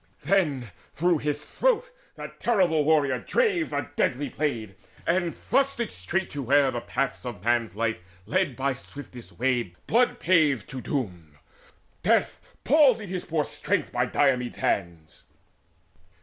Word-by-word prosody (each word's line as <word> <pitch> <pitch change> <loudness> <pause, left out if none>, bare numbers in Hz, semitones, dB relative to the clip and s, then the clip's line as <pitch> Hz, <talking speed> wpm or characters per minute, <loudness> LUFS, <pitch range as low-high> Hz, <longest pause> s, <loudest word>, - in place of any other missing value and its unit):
Then 150 - +1 0.2
through 175 0 +2
his 150 0 -2
throat - - +1 0.2
that - - -9
terrible 180 -10 +2
warrior 145 -4 +3
drave 395 -10 +1
The 145 - -2
deadly 140 +3 0
blade, 120 -9 -2 0.3
and 175 -1 +1
thrust 275 -2 0
it 235 - -2
straight 135 - -2
to 145 - -4
where 135 +1 +3
The 120 -2 -3
paths 135 +1 -2
of 120 -7 -7
man's 115 -4 +1
life 110 -1 -1 0.3
lead 150 - 0
by 135 +1 0
swiftest 130 -2 -10
way 120 -7 0
Blood 240 +2 +2
paved 155 - +3
to 130 -1 -5
doom: 90 - -4 0.6
death - - +2 0.2
palsied 255 - +4
his 185 -1 -4
poor 160 -3 0
strength - - -2
By - - 0
Diomedes' 125 -4 +1
hands. 85 -5 -2
145 Hz, 140 wpm, -26 LUFS, 120-180 Hz, 0.6 s, palsied